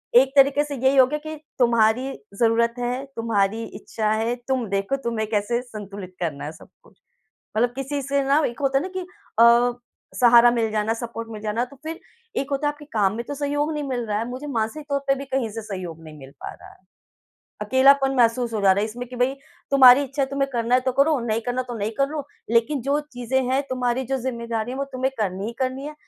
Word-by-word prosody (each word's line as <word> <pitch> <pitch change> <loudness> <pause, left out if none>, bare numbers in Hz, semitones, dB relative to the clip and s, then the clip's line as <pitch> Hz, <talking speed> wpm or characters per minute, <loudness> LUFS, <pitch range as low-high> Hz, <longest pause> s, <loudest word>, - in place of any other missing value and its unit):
एक 260 +2 +6
तरीके 280 +1 +5
से 295 -1 -5
यही 265 +1 +2
हो 260 - +8
गया 300 - -2
कि 310 0 -6 0.2
तुम्हारी 235 +2 +3 0.3
ज़रूरत 235 0 +3
है, 250 +3 -2
तुम्हारी 225 -1 0 0.2
इच्छा 215 -1 -2
है, 225 +2 0
तुम 260 -3 0
देखो 195 +6 0
तुम्हें 225 -2 -1
कैसे 225 +3 0
संतुलित 205 -6 -9
करना 155 -6 -3
है 150 - -5
सब 155 - -15 0.2
कुछ। - - -23 0.6
मतलब 240 +2 +3
किसी 275 +1 -3
से 280 +1 0
ना 275 +2 +3
एक 235 - -8
होता 270 -1 +2
है 275 - +1
ना 370 - -3
कि - - -2 0.4
अ, 235 +1 +6 0.5
सहारा 240 0 +7
मिल 230 -2 0
जाना, 215 +1 0
सपोर्ट 230 -1 -6
मिल 215 - -7
जाना, 220 +3 -1
तो 280 - -16
फिर 325 +1 -5 0.4
एक 275 +1 -2
होता 280 +2 0
है 290 - 0
आपके 295 0 -14
काम 200 -3 +2
में 235 - -3
तो - - -4
सहयोग 290 +2 -1
नहीं 300 -1 -3
मिल 245 -3 -2
रहा 210 -1 -1
है, 230 - -3
मुझे 260 +4 -6
मानसिक 245 +3 -2
तौर 280 0 +1
पे 275 - +4
भी 275 +1 -6
कहीं 260 -4 -1
से 225 +2 -5
सहयोग 185 -6 -7
नहीं 155 -1 -11
मिल 135 0 -12
पा - - -5
रहा - - -14
है। - - -18 0.9
अकेलापन 270 +1 +4
महसूस 235 0 +2
हो 215 - -1
जा 195 -1 +5
रहा 200 - +1
है - - +1
इसमें 245 +3 -7
कि 250 - -9
भई 250 +2 +1 0.4
तुम्हारी 265 -1 +8
इच्छा 275 +1 -2
है - - +1
तुम्हें 275 0 0
करना 235 -1 0
है 255 - +5
तो 260 0 -1
करो, 280 +2 +3
नहीं 225 -1 -1
करना 245 +1 0
तो 245 -1 -7
नहीं 205 +1 -1
करो, 285 +2 0 0.3
लेकिन 235 +5 +2
जो 280 +3 +1
चीज़ें 245 +2 -1
हैं 270 +2 +2
तुम्हारी 255 0 0
जो 270 - +2
ज़िम्मेदारी 235 -2 -3
है - - -5
वो 275 - 0
तुम्हें 260 +1 -1
करनी 195 -1 -2
ही 230 - -4
करनी 260 +1 -2
है, 300 - -7
245 Hz, 230 wpm, -23 LUFS, 225-275 Hz, 0.9 s, हो